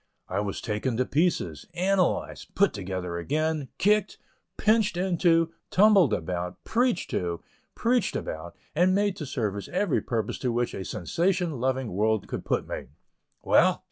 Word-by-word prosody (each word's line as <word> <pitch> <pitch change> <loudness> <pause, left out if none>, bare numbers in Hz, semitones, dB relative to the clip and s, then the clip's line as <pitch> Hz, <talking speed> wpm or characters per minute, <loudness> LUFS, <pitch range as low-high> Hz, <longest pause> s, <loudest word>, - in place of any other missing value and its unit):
I 95 - -2
was 100 -1 -3
taken 110 +2 -2
to 130 - +2
pieces, 140 - 0
analyzed, 185 +1 0
put 200 -1 +3
together 95 -3 -4
again, 155 - -1
kicked, 210 +2 +2 0.4
"pitched 215 -3 +2
into," 170 -2 +2 0.2
tumbled 195 - +5
about, 90 -2 -3
preached 240 -5 0
to, 85 -2 -2 0.3
preached 235 -4 +1
about, 85 +4 -5 0.2
and 180 +4 +3
made 205 -1 +1
to 150 - -5
serve 105 -6 -2
every 185 -3 +1
purpose 110 -4 -2
to 125 - 0
which 120 +1 -1
a 95 - -5
sensation 170 - -1
loving 130 -1 -1
world 105 +2 +1
could - - -5
put - - 0
me. - - -5 0.6
Well! - - +4
140 Hz, 145 wpm, -27 LUFS, -, 0.6 s, tumbled